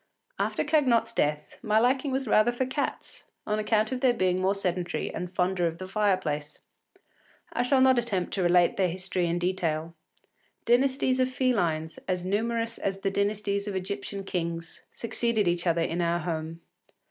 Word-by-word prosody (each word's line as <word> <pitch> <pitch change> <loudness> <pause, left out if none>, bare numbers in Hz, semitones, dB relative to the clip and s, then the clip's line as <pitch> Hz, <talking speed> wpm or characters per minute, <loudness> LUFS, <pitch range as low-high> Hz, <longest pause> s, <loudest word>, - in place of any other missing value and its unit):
After - - 0
Cagnotte’s 290 -6 +2
death, 150 0 -1
my 215 -2 +1
liking 260 +4 +2
was 265 -1 -1
rather 215 +2 +4
for 245 +2 -1
cats, 265 +3 -4 0.2
on 210 0 0
account 215 +1 +1
of 255 -1 -3
their 250 -2 +4
being 185 0 +1
more 190 +2 +2
sedentary 180 -2 -2
and 180 0 -5
fonder 180 -1 +1
of 165 0 -4
the 185 +1 -7
fireplace. 185 -8 -1 1.0
I - - 0
shall 260 +2 +3
not 260 -1 +5
attempt 200 -7 -2
to 195 - -1
relate 175 0 +4
their 185 -2 +2
history 180 0 -2
in 170 +1 0
detail. 170 -3 -1 0.7
Dynasties 260 +1 +2
of 255 0 +2
felines, 175 -12 0
as 180 -1 -1
numerous 230 +3 -1
as 195 0 -2
the 195 - 0
dynasties 200 0 -1
of 200 - -3
Egyptian 195 +1 -4
kings, 170 -3 -4
succeeded 230 -3 0
each 175 +1 0
other 170 0 +2
in 170 +1 -1
our 170 0 +1
home. 165 -1 -4
195 Hz, 170 wpm, -27 LUFS, 175-235 Hz, 1.0 s, not